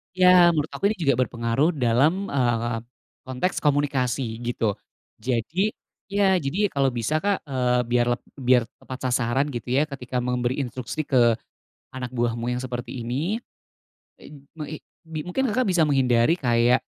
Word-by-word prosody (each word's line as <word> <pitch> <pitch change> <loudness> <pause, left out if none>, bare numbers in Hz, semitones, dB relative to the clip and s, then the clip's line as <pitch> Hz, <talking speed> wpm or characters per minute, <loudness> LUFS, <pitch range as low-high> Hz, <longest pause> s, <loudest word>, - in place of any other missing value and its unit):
Ya 180 -2 +6
menurut 155 0 -1
aku - - -10
ini - - -17
juga 140 -5 +2
berpengaruh 120 +9 0
dalam, 145 +9 +2
eee, 120 -3 0 0.5
konteks 130 +8 -2
komunikasi 135 -5 0
gitu. 115 -4 -1 0.4
Jadi 130 - -1 0.3
iya, 195 -1 +2
jadi 180 +7 0
kalau 135 -4 +1
bisa 120 +6 0
Kak, 200 +3 0
eee, 125 -2 +1
biar 120 0 +3
leb - - -6 0.2
biar 125 -2 +4 0.2
tepat 130 0 -5
sasaran 125 +4 +1
gitu 120 -1 -4
ya 150 +3 +2
ketika 125 -2 -4
memberi 125 +2 -1
instruksi 130 +4 -4
ke 120 -5 +4 0.6
anak 125 -1 -5
buahmu 120 0 0
yang 125 - -1
seperti 125 -1 -5
ini, 155 - -1 0.8
e - - -18 0.3
meng 150 - -4
i - - -5 0.3
bi 160 -1 -5
mungkin 265 +9 0
Kakak 250 -1 +1
bisa 175 -4 +3
menghindari 130 0 +3
kayak 120 -1 +3
130 Hz, 155 wpm, -24 LUFS, 120-155 Hz, 0.8 s, Ya